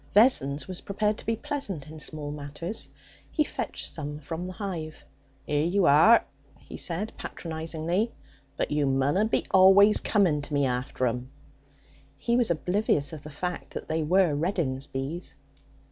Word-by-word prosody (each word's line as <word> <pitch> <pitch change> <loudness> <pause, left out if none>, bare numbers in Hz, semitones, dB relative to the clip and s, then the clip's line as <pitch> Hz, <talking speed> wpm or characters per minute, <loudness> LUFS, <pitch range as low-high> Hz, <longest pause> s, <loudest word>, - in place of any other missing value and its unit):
Vessons 150 - +4
was 185 -1 -6
prepared 210 +1 -1
to - - -9
be 225 - +2
pleasant 205 - -4
in 155 +1 -10
small 150 -1 -2
matters. 150 +7 -5 0.4
He 305 - +2
fetched - - -4
some 150 -2 -5
from 165 +4 -5
the 185 - -6
hive. 175 -6 -6 0.4
''Ere 145 0 +1
you 195 -1 +3
are,' 165 +12 +6 0.3
he - - -12
said 195 +6 -2
patronizingly; 165 +6 -3 0.5
'but - - -1
you 145 -1 +1
munna 135 +9 +2
be 220 - 0
always 195 +2 +7
coming 180 -9 +2
to 145 +1 -8
me 140 -1 +3
after 125 0 -1
'em.' 125 +1 -2 0.9
He 235 - 0
was 240 -4 +3
oblivious 170 -3 +1
of 155 - -7
the 150 - -10
fact 180 +4 -5
that - - -6
they 160 +1 0
were 175 +1 +3
Reddin's 145 -4 -1
bees. 140 +7 -4
165 Hz, 160 wpm, -27 LUFS, 145-195 Hz, 0.9 s, always